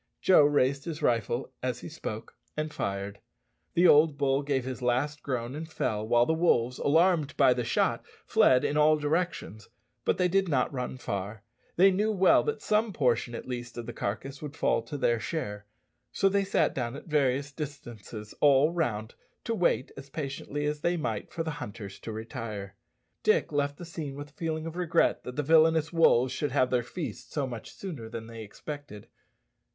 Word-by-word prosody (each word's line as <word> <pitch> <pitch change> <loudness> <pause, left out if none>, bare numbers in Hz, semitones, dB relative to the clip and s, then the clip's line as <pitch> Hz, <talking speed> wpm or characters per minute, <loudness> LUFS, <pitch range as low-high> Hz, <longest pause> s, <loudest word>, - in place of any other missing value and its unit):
Joe 185 - +6
raised 140 -1 +2
his 160 -2 -5
rifle 120 +1 0
as 125 -1 -2
he - - -7
spoke, 110 -9 -7 0.2
and 155 0 -2
fired. 100 +1 -3 0.6
The 175 +1 +6
old 150 -1 +5
bull 140 -1 +2
gave 140 -3 -1
his 130 -1 -5
last 130 +4 0
groan 125 -2 -3
and 160 +2 -7
fell, 110 -7 -2
while 120 +1 +4
the 160 - +1
wolves, 125 -7 +2
alarmed 160 0 +2
by 135 -3 +6
the 125 0 -2
shot, 115 - +1 0.2
fled 125 -1 +4
in 150 - 0
all 155 +1 +5
directions; 150 - -2 0.3
but - - +1
they 180 - +3
did 190 0 +1
not 135 -2 +1
run 125 0 -4
far. 100 -1 -5 0.3
They 190 +3 +6
knew 210 +4 +1
well 190 -3 +5
that 445 - -2
some 215 +1 +2
portion, 125 -5 +1
at - - -7
least, 120 -2 -6
of 120 - -5
the 120 - -6
carcass 135 +7 -4
would 145 -2 -7
fall - - +2
to 145 - -5
their 120 -4 +2
share; 105 -5 -4 0.4
so 195 - +2
they 200 0 +1
sat 195 - +2
down 120 -1 -3
at 145 - -9
various 140 -2 +1
distances 120 -7 -8
all 145 +1 +5
round, 115 -10 -2 0.3
to 230 - -1
wait 180 - +1
as 135 0 -10
patiently 145 0 -4
as 150 0 -2
they 175 +2 +1
might 115 -9 -3
for 165 - -3
the 160 - -3
hunters 100 -3 -7
to 115 - -7
retire. 110 -3 -6 0.5
Dick - - +2
left 145 0 0
the 175 - -8
scene 160 -4 -6
with 145 +1 -8
a - - -36
feeling 160 -1 -3
of 165 0 -6
regret 175 -2 +2
that 125 - -6
the 150 - -1
villanous 160 +1 +4
wolves 130 -6 +4
should 145 +1 -2
have 130 -2 +2
their 125 -1 +3
feast 125 - -7
so 145 -3 -1
much 120 -4 -7
sooner 150 - -7
than 115 0 -6
they 115 0 -9
expected. 110 +1 -8
140 Hz, 190 wpm, -28 LUFS, 120-160 Hz, 0.6 s, Joe